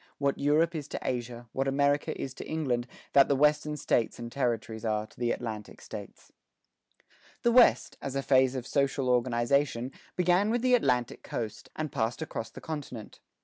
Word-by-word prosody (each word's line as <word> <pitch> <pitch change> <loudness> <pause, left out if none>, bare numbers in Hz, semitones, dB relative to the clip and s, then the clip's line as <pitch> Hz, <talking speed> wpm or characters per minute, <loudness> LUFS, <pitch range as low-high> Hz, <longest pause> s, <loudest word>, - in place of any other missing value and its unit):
What 140 -1 0
Europe 155 +4 +3
is 150 -3 -4
to - - -5
Asia, 120 -1 -3
what 135 +1 0
America 140 +1 +1
is 130 - -4
to - - -8
England, 130 -6 -1 0.3
that 140 -1 +7
the 140 - +2
Western 150 +1 +2
States 120 -4 0
and 120 0 -7
Territories 115 -4 -2
are 110 -1 0
to - - -20
the 120 -1 +1
Atlantic 110 -3 -5
States." - - -10 1.1
The 235 - +4
West, 245 0 +5
as 135 -1 -4
a 135 - -1
phase 130 -1 +4
of 125 -2 -4
social 135 -1 0
organization, 125 +1 +1 0.2
began 180 +3 +3
with 240 +1 0
the 255 0 +3
Atlantic 125 - +2
coast, 110 -3 -5
and 155 -1 -3
passed 120 +4 -1
across 115 -7 -5
the - - -11
continent. 140 -8 -7
135 Hz, 175 wpm, -29 LUFS, 120-150 Hz, 1.1 s, that